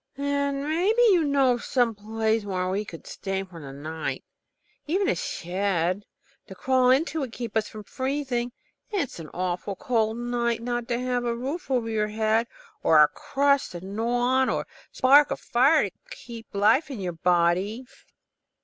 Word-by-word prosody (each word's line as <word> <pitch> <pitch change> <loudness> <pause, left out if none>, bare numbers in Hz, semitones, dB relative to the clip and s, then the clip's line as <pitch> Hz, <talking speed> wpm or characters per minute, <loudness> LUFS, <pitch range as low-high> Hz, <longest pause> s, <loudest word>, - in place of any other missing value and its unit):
"Then 280 0 -1
maybe 385 +10 +2
you 350 -4 +4
know 275 -3 +3
of 240 - -5
some 245 -3 +1
place 220 +1 -1
where 185 -2 -2
we 200 +3 -1
could 170 -5 -11
stay 195 0 -4
to 165 -7 -10
night. 155 +3 -5 0.6
Even 380 +5 +1
a 445 - +3
shed 185 +1 -1 0.4
to 190 - -10
crawl 255 +5 +2
into 310 +5 +2
would 265 -5 -3
keep 235 -2 -6
us 220 -1 +1
from 215 -1 -9
freezing. 260 -1 -2 0.4
It's 375 - -2
an 155 -2 -8
awful 180 +2 -3
cold 230 -5 0
night 235 -1 -1
not 240 -1 -2
to 240 -1 -1
have 250 -1 -1
a 235 -1 -1
roof 275 +6 -4
over 245 -4 +1
your 215 -1 0
head, 220 +2 +1 0.3
or - - +5
a - - +8
crust 280 -5 +1
to 175 - -6
gnaw 230 +5 -1 0.2
on, 260 - +2
or - - 0
a - - -10 0.3
spark 280 +3 +5
of - - -3
fire 275 +6 +3
to - - -11 0.2
keep 235 - -10
life 220 +9 +3
in 265 -6 -6
your 180 -2 -3
body." 180 +7 +1
235 Hz, 175 wpm, -26 LUFS, 200-270 Hz, 0.6 s, a